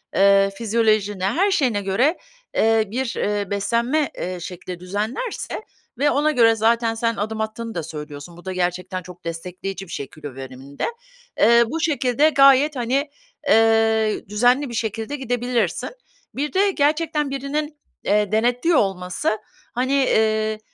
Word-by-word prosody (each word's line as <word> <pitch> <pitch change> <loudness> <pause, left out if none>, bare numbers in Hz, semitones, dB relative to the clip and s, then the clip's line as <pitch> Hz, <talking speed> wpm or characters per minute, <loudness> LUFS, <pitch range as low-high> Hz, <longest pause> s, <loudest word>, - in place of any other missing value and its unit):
eee, 195 0 +5
fizyolojine, 215 -4 +1
her 355 - +2
şeyine 250 - +1
göre, 240 - +1 0.4
eee, 225 0 +3
bir, 250 +1 -2
eee, 205 -1 -1
beslenme, 235 +9 0
eee, 180 0 -4
şekli 180 +1 -7
düzenlerse 215 - -4 0.4
ve 290 +1 +3
ona 300 +2 +2
göre 230 -4 +5
zaten 230 +1 +2
sen 230 0 0
adım 220 +1 -3
attığını 225 0 -5
da 170 - -2
söylüyorsun, 150 +1 -8
bu 175 - -15
da 190 - -3
gerçekten 180 +1 -2
çok 180 -1 -13
destekleyici 180 +3 -5
bir - - -12
şey 140 -3 -4
kilo 145 -3 -10
veriminde. 135 +1 -6 0.5
Eee, 235 +2 +6
bu 320 +7 -3
şekilde 290 -2 +2
gayet, 275 +1 +5
hani, 265 +4 0 0.4
eee, 225 -2 +3
düzenli 245 +6 +2
bir - - -7
şekilde 225 +4 -3
gidebilirsin. 245 -2 -1 0.5
Bir 295 +2 -2
de 395 +1 +3
gerçekten 300 -1 +1
birinin, 295 +3 -3 0.3
eee, 210 0 +2
denetliyor 245 +9 +2
olması, 190 +1 0 0.4
hani, 255 +3 0
eee, 220 -5 +2
225 Hz, 140 wpm, -22 LUFS, 195-270 Hz, 0.5 s, Eee